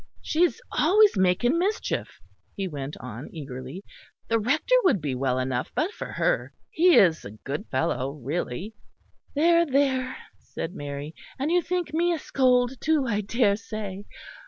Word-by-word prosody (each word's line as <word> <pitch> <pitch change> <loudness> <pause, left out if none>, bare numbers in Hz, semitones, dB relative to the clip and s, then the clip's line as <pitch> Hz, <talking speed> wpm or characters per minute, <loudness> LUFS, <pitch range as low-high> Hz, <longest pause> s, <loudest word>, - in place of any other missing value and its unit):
"She 315 - 0
is 355 - +3
always 410 +5 +4
making 190 - +2
mischief," 405 +5 -2 0.4
he 195 -1 -2
went 145 -3 -6
on 125 +2 -8
eagerly. 135 +3 -7 0.5
"The 230 0 +3
Rector 280 - 0
would 280 - +3
be 145 -4 -2
well 130 0 0
enough 130 -1 -2
but 330 +6 0
for - - -7
her. - - 0 0.2
He 350 +2 +5
is 170 -5 +5
a - - -7
good 135 - -6
fellow, 130 +1 -1
really." 150 - -4 0.6
"There, 335 +3 +5
there," 265 -3 +1 0.2
said 170 - -6
Mary, 145 -2 -6 0.2
"and 280 +5 -1
you 355 0 +4
think 350 -3 -2
me 345 +2 +2
a - - -1
scold, 255 -3 +1
too, 310 -3 +2
I 210 -4 0
daresay. 205 -2 -1
215 Hz, 155 wpm, -26 LUFS, -, 0.6 s, He